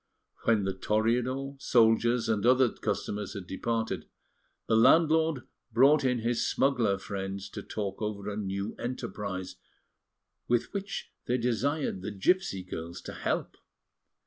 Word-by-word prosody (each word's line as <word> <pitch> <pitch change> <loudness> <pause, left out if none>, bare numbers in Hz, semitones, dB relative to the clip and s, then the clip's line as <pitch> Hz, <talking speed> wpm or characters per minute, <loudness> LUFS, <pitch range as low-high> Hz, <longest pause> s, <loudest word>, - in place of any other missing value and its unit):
When 110 -3 +3
the 95 0 -1
Toreador, 125 +7 0
soldiers, 115 0 +3
and 110 -3 +1
other 125 0 +5
customers 105 +1 -3
had 100 -3 -6
departed, 115 +4 -2 0.6
the 110 - +2
landlord 160 +3 +4 0.3
brought 135 +6 +5
in 125 -3 +1
his 115 +1 0
smuggler 120 -8 +2
friends 95 0 -5
to - - -6
talk 100 -2 -4
over 105 -1 -3
a 105 - -3
new 100 0 -3
enterprise, 100 -6 -4 0.9
with 120 +7 +1
which 200 -1 -4 0.2
they 125 - +2
desired 125 -1 0
the 95 - -4
gipsy 100 - +1
girls 85 -1 -6
to - - -8
help. - - -2
115 Hz, 130 wpm, -29 LUFS, 100-130 Hz, 0.9 s, other